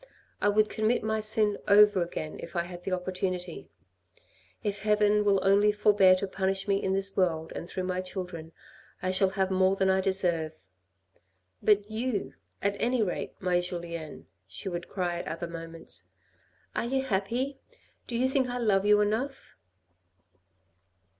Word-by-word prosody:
I 205 - +4
would 215 +1 +3
commit 220 +2 0
my 220 0 0
sin 215 -1 0
over 205 -2 +6
again 155 -2 -4
if 170 - -9
I 170 - +1
had 175 0 -9
the 195 - -2
opportunity. 180 -1 -3 0.9
If 205 -1 -2
heaven 210 0 +3
will 200 -1 +3
only 200 +2 +5
forbear 205 -3 +5
to 185 - -2
punish 190 +1 -2
me 195 0 +2
in 190 - 0
this 195 0 -2
world 165 -4 0
and 170 - -6
through 185 - -3
my 185 0 -1
children, 180 -3 -6 0.5
I 185 - +1
shall 190 +1 +3
have 190 0 +1
more 190 +1 +3
than 190 -1 +2
I 190 0 +2
deserve. 175 -5 +2 1.1
But 210 0 +3
you, 225 -1 -2 0.3
at 200 0 +1
any 245 -1 +2
rate, 180 - -3
my 180 -1 +1
Julien," 170 -3 -5 0.2
she 95 - -6
would 175 -2 -4
cry 175 -3 -2
at - - -6
other 165 +1 -4
moments, 165 -1 -8 0.7
"are - - 0
you 265 +2 0
happy? 245 +5 -1 0.5
Do 235 - -3
you 255 +2 +2
think 260 -1 +1
I 245 - -3
love 205 -4 +2
you 210 0 +6
enough 230 +7 -2
195 Hz, 160 wpm, -28 LUFS, 180-210 Hz, 1.1 s, over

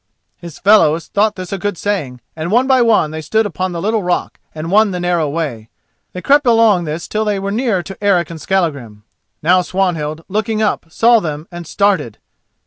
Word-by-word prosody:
His 170 -3 -11
fellows 170 -6 +4
thought 210 +1 0
this 185 0 -7
a 195 - -3
good 205 -1 -3
saying, 150 -13 -3
and 160 +1 -4
one 240 +6 +3
by 265 -1 +3
one 220 -10 +3
they 160 0 -5
stood 220 +9 0
upon 185 -1 -3
the 170 - -4
little 215 +4 0
rock 180 -1 -2 0.2
and 160 +2 -5
won 215 +1 +4
the 180 -2 -4
narrow 175 -4 0
way. 140 -8 -4 0.4
They 180 - -7
crept 285 -1 +3
along 225 -6 +4
this 155 +2 -5
till 215 0 -1
they 210 -2 -1
were 195 +1 -3
near 215 -5 0
to 195 +2 -10
Eric 180 -4 +2
and 160 -2 -9
Skallagrim. 140 - -2 0.4
Now 180 +3 +4
Swanhild, 165 -4 -2
looking 215 +2 -2
up, 215 -6 -1
saw 230 +7 +4
them 155 -3 -5
and 175 -2 -8
started. 195 - 0
185 Hz, 200 wpm, -16 LUFS, 160-210 Hz, 0.4 s, fellows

